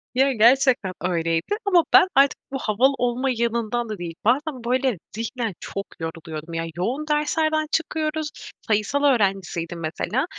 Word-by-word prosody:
Ya, 270 +2 +4
gerçekten 245 -3 +4
öyleydi. 165 - 0
Ama 360 -4 +5
ben 370 - +8
artık 275 0 +4
bu 270 - -2
havalı 245 +6 +2
olma 245 +2 0
yanından 235 0 -1
da 215 - -4
değil, 170 -2 -6
bazen 260 +1 +1
böyle 255 -2 +1 0.2
zihnen 230 -1 -3
çok 195 0 -5
yoruluyordum. 160 0 -6
Ya, 165 0 -2
yoğun 250 +12 -2
derslerden 310 +1 +1
çıkıyoruz. 315 -1 -1 0.4
Sayısal 220 +7 +1
öğrencisiydim 195 - +1
mesela 190 - -2
240 Hz, 140 wpm, -23 LUFS, 190-280 Hz, 0.4 s, ben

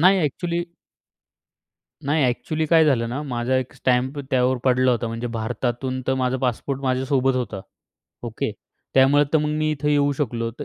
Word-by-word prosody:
नाही. 190 +3 +6
अ‍ॅक्चुअली 170 +4 -1 1.4
नाही, 150 +1 +2
अ‍ॅक्चुअली 155 +6 -1
काय 160 0 +5
झालं 120 -6 +2
ना 130 +5 -3
माझा 125 -2 -1
एक 130 -1 -2
स्टॅम्प 130 +3 0
त्यावर 130 0 +2
पडला 130 0 +3
होता, 120 -1 0
म्हणजे 115 +2 -4
भारतातून 120 +3 -2
तर 130 - +2
माझा 125 +1 +1
पासपोर्ट 130 +3 -2
माझ्यासोबत 130 0 +1
होता. 105 -6 -3 0.6
ओके, - - -3 0.4
त्यामुळे 140 +2 +5
तर 160 - +5
मग 150 0 -1
मी 155 0 +1
इथं 150 0 -2
येऊ 145 -1 +3
शकलो, 120 -4 -2
तर 135 +6 -8
130 Hz, 165 wpm, -23 LUFS, 125-145 Hz, 1.4 s, नाही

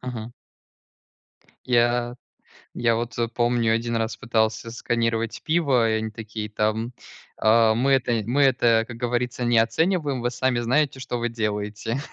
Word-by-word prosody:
Мгм. 115 0 -7 1.3
Я 120 0 +2 0.6
я 115 -1 +1
вот, 120 +1 -4
э, 115 -1 +1
помню, 120 -1 +1
1 115 +1 -1
раз 115 0 -2
пытался 110 -2 0
сосканировать 115 -1 -1
пиво, 140 -8 +2
и - - +1
они 110 0 -1
такие 110 -1 -6
там, 110 +3 -1 0.4
а: 110 0 +4
"Мы 135 +4 +1
это 120 -4 +2
мы 130 +6 +1
это, 120 -4 +3
как 120 -2 -8
говорится, 120 0 -2
не 120 -1 +3
оцениваем, 145 +3 +1
вы 120 0 -1
сами 130 -1 0
знаете, 135 +3 +1
что 125 -1 -4
вы 120 0 -2
делаете". 105 +2 -3
120 Hz, 150 wpm, -24 LUFS, 115-125 Hz, 1.3 s, а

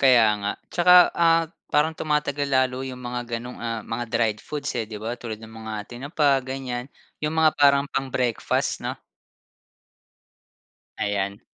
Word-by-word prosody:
Kaya 125 -4 +6
nga 100 - -1 0.2
tsaka, 180 +1 +6 0.3
ah, 165 0 +4 0.3
parang 155 +2 +3
tumatagal 145 -2 0
lalo 130 -1 +2
yung 125 - -9
mga 125 0 -3 0.2
ganong, 125 +2 -8
ah, 115 -1 -3
mga 120 +1 -1
dried 110 -3 +1
foods, 150 -1 -3
eh, 110 - -3
di 105 - -5
ba 115 +2 -3
tulad 110 -2 -6
ng 110 0 -12
mga 110 0 -6 0.2
tinapa 145 +5 -1 0.2
ganyan 130 -2 -4 0.4
yung 150 +1 -1
mga 160 -1 +6
parang 140 -1 +6
pang 135 0 -1
breakfast, 125 -3 0
'no? - - -2 2.0
Ayan. 100 0 -1
125 Hz, 150 wpm, -24 LUFS, 115-145 Hz, 2.0 s, Kaya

